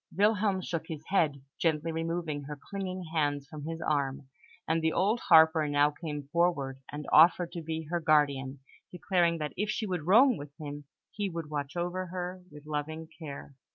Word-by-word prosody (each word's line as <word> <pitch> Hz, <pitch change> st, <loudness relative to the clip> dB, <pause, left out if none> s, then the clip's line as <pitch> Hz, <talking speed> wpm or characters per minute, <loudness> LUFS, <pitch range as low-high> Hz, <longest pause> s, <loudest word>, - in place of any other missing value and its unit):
Wilhelm 205 Hz, -2 st, +3 dB
shook 165 Hz, -2 st, -3 dB
his 155 Hz, -2 st, -6 dB
head, 150 Hz, -8 st, +1 dB, 0.2 s
gently 165 Hz, -1 st, +1 dB
removing 165 Hz, -3 st, -3 dB
her 145 Hz, 0 st, -7 dB
clinging 185 Hz, -2 st, -4 dB
hands 145 Hz, -3 st, 0 dB
from 150 Hz, -1 st, -8 dB
his 165 Hz, +1 st, -5 dB
arm; 140 Hz, -3 st, -1 dB, 0.4 s
and 160 Hz, +1 st, +1 dB
the 160 Hz, 0 st, +2 dB
old 210 Hz, +5 st, +2 dB
harper 160 Hz, -4 st, +6 dB
now 145 Hz, 0 st, +3 dB
came 150 Hz, -1 st, -6 dB
forward 145 Hz, -6 st, +1 dB
and 150 Hz, 0 st, -6 dB
offered 170 Hz, +2 st, +6 dB
to 170 Hz, -1 st, -5 dB
be 160 Hz, 0 st, -4 dB
her 175 Hz, -, +1 dB
guardian, 140 Hz, -4 st, +2 dB, 0.3 s
declaring 175 Hz, -2 st, +1 dB
that 150 Hz, -3 st, -4 dB
if 210 Hz, +2 st, -1 dB
she 220 Hz, +1 st, -1 dB
would 180 Hz, -5 st, -3 dB
roam 240 Hz, +5 st, +6 dB
with 145 Hz, 0 st, -10 dB
him, 145 Hz, -1 st, -7 dB, 0.3 s
he 205 Hz, -2 st, -2 dB
would 165 Hz, -3 st, -6 dB
watch 145 Hz, 0 st, -4 dB
over 180 Hz, +2 st, -2 dB
her 180 Hz, +1 st, -5 dB
with 150 Hz, 0 st, -13 dB
loving 155 Hz, +2 st, -4 dB
care. 145 Hz, -3 st, -8 dB
160 Hz, 180 wpm, -30 LUFS, 145-180 Hz, 0.4 s, harper